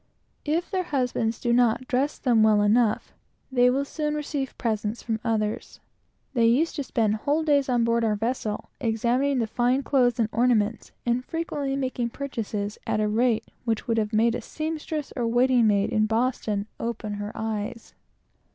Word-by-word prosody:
If 325 +6 -1
their 375 -2 +1
husbands 250 -6 -1
do 240 - +1
not 245 +1 +2
dress 270 +4 0
them 235 -4 +3
well 215 -1 +5
enough, 215 +1 +2 0.4
they 250 -1 +5
will 275 +3 +1
soon 300 +1 -2
receive 285 -3 -3
presents 220 -1 -2
from 225 -1 -2
others. 215 -2 -2 0.5
They 235 -3 +3
used 280 +9 +2
to 285 - -1
spend 220 -4 0
whole 290 +8 0
days 285 -3 +2
on 240 -2 +2
board 230 0 +2
our 215 -2 +2
vessels, 220 -1 -2
examining 245 +3 +1
the 235 - +1
fine 245 +4 +1
clothes 250 -4 +2
and 225 - +3
ornaments, 230 -2 +1
and 240 +1 +1
frequently 290 -3 -3
made 255 -3 -2
purchases 215 -7 -4
at - - 0
a 215 - +2
rate 225 +1 +1 0.2
which 230 -3 -2
would 230 -1 +2
have 210 -1 -1
made 225 +1 +3
a - - -3
seamstress 310 -1 -4
or 240 -2 -1
waiting 245 0 +4
maid 200 -1 +2
in 215 0 +2
Boston 225 -3 0
open 230 -2 -3
her 205 +1 -4
eyes. 220 0 -4
235 Hz, 170 wpm, -25 LUFS, 220-265 Hz, 0.5 s, well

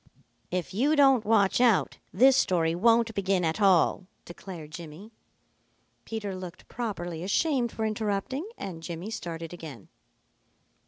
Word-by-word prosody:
"If 180 0 -3
you 275 +10 +2
don't 270 -6 +5
watch 210 0 +3
out, 235 -5 +3
this 265 +1 +5
story 170 -10 +2
won't 230 +5 +3
begin 195 -3 0
at 160 +6 -1
all," 185 -1 +3 0.2
declared 175 -3 -9
Jimmy. 170 +6 -10 0.9
Peter 210 -4 -4
looked 185 -1 -9
properly 175 -8 -5
ashamed 240 - +1
for 220 - -3
interrupting, 215 - -2
and 175 -4 -7
Jimmy 170 +5 -6
started 165 -5 -6
again. 150 - -10
195 Hz, 125 wpm, -27 LUFS, 175-225 Hz, 0.9 s, don't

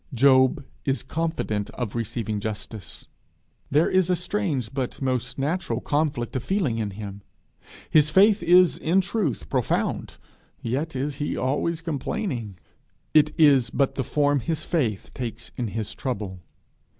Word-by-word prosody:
Job 130 +1 +4 0.2
is 135 0 -1
confident 160 -11 -2
of 120 -5 -3
receiving 115 -2 -2
justice. 110 0 -6 0.6
There 150 +4 +4
is 185 -1 +2
a 180 - +4
strange 175 - -2
but 130 -3 -3
most 130 -3 -1
natural 155 +7 -1
conflict 145 -6 -1
of 130 - -1
feeling 165 - 0
in 105 -2 -1
him. 100 -1 -7 0.7
His 150 -1 +4
faith 200 +5 +5
is 175 0 +5
in 180 +5 +3
truth 190 - -2
profound, - - -1 0.4
yet 135 +7 -2
is 140 +2 -2
he 145 - -2
always 150 +5 0
complaining. 140 - -3 0.6
It 150 -1 +5
is 140 -7 +5
but 135 +2 +1
the 135 - -2
form 145 +2 +2
his 155 +4 -2
faith 120 - -1
takes 120 -2 -6
in 120 - -2
his 110 0 -4
trouble. 100 -8 -4
135 Hz, 140 wpm, -25 LUFS, 115-165 Hz, 0.7 s, faith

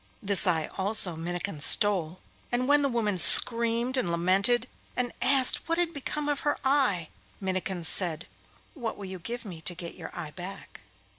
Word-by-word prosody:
This 200 0 +3
eye 160 -3 0
also 190 -3 +5
Minnikin 175 +1 -5
stole, 185 +1 +2 0.3
and 250 +1 -1
when 290 +1 +3
the 280 - 0
woman 215 -6 -1
screamed 235 +6 +5
and 225 -9 0
lamented, 195 +8 +1 0.3
and 245 -1 -2
asked 270 +3 +3
what 330 - 0
had 345 -1 -1
become 295 +1 -5
of 290 -1 -1
her 290 - -2
eye, 260 - +1 0.3
Minnikin 185 -2 -3
said, 170 -1 0 0.5
'What 240 -8 -6
will 200 - -9
you 185 -1 -8
give 235 +7 -7
me 175 -5 -9
to 175 +3 -5
get 170 -1 -7
your - - -10
eye 155 -3 -7
back? 185 +4 -10
200 Hz, 170 wpm, -27 LUFS, 175-250 Hz, 0.5 s, also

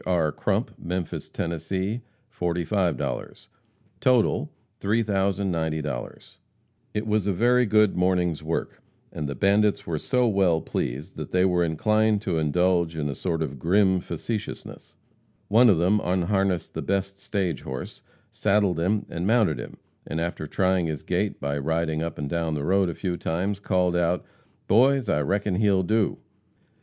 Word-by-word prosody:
R. 85 -4 +2
Crump, - - -1
Memphis, 90 -1 -4
Tenn., 85 0 -3 0.8
45 90 -1 0
00 - - -3 0.7
Total, 125 -4 +2 0.3
$3,090 95 -7 0
00 - - -4 0.8
It 105 +1 -1
was 105 -2 +1
a 100 - +2
very 120 +5 +3
good 105 -1 +4
morning's 90 -3 +1
work, 80 +1 -3 0.3
and 75 -2 -4
the 70 - -4
bandits 100 +1 +2
were 80 -2 -2
so 125 - +1
well 95 -6 +3
pleased 65 -2 -4
that - - -6
they 90 0 +3
were 90 -2 +2
inclined 105 +6 +2
to 80 - 0
indulge 85 +2 +1
in 75 -2 -1
a - - -2
sort 80 +2 -2
of 70 -3 -6
grim 95 +3 +3
facetiousness. 100 +6 -6 0.5
One 115 +4 +6
of 95 - +5
them 95 +5 +2
unharnessed 95 0 0
the - - -4
best 100 0 -2
stage 95 - -2
horse, 65 -1 -7 0.3
saddled 100 -4 +1
him 100 +5 0
and 85 +2 -3
mounted 110 -8 +3
him, - - -8 0.3
and 80 - -3
after 85 -2 -3
trying 95 0 +1
his 75 -3 -4
gait - - -1
by 70 0 -2
riding 80 +1 -1
up 85 -1 -4
and 75 - -3
down 80 0 -1
the 75 -1 -3
road 95 +1 +3
a 85 - -5
few 90 -3 -2
times, 95 +5 -2
called 90 -3 +1
out: 85 0 +1 0.4
"Boys, 130 +1 +4
I 75 - +2
reckon 100 +4 0
he'll 100 -3 +3
do!" 110 +3 +1
90 Hz, 155 wpm, -25 LUFS, 80-100 Hz, 0.8 s, One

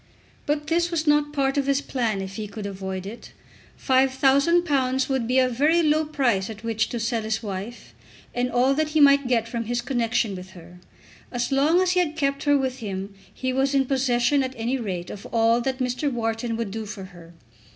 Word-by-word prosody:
But 295 0 0
this 340 +2 +1
was 330 -2 -1
not 295 -1 +3
part 275 -1 0
of 275 - -2
his 275 0 +2
plan, 230 -8 -2
if 190 0 -7
he 215 -1 -4
could 205 0 -7
avoid 190 -1 -5
it. 220 +4 -9 0.5
£5000 270 +1 +2
would 260 -4 0
be 250 +2 +1
a 260 -1 +5
very 300 +8 +2
low 310 0 +2
price 245 -10 0
at 220 0 -9
which 225 -1 -1
to 240 - -3
sell 230 0 -1
his 220 +1 -2
wife, 205 +3 -7 0.4
and 250 +1 -1
all 255 +2 +3
that 310 +2 0
he - - +5
might 280 -2 +6
get 230 -2 +1
from 230 0 -4
his 240 +2 -1
connection 235 -4 0
with 185 0 -9
her. 175 0 -14 0.5
As 245 +2 -2
long 295 +6 +3
as 365 - +1
he 360 0 +3
kept 275 -3 -1
her 290 0 +4
with 260 -1 -2
him 195 -2 -5 0.2
he 260 0 -3
was 270 +2 +1
in 270 -1 +3
possession 260 +1 +2
at 260 0 -3
any 240 +4 -1
rate 185 -6 -4
of 200 - -9
all 230 +1 +2
that 260 +1 -2
Mr. 255 +2 -1
Wharton 225 -1 -2
would 230 -4 -3
do 220 +1 -5
for 205 -1 -7
her. 175 -2 -14
250 Hz, 205 wpm, -24 LUFS, 220-275 Hz, 0.5 s, might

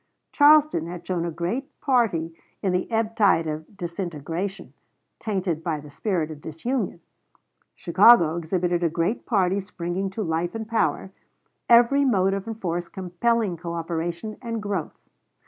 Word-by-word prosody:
Charleston 295 - +5
had 175 0 -8
shown 175 -2 -1
a - - -2
great 175 - -4
party 215 - +1 0.3
in 190 -2 +1
the 180 - 0
ebbtide 220 -6 +2
of 155 +5 -6
disintegration, 175 +1 -5 0.5
tainted 185 -6 -2
by 160 -3 -1
the 145 0 -12
spirit 165 0 -2
of 150 -1 -9
disunion. 180 - -3 0.7
Chicago 170 -9 +5
exhibited 175 +1 -1
a 170 - +2
great 170 +7 -2
party 195 -4 +2
springing 185 0 -4
to 210 +3 -4
life 170 +2 -2
and 220 -1 -4
power, 225 -4 0 0.6
every 245 +4 +6
motive 195 -5 +1
and 225 -1 -5
force 175 -2 -2
compelling 190 +2 -1
coöperation 170 +4 -4
and 230 -2 -3
growth. 200 -6 -4
185 Hz, 135 wpm, -24 LUFS, 170-220 Hz, 0.7 s, every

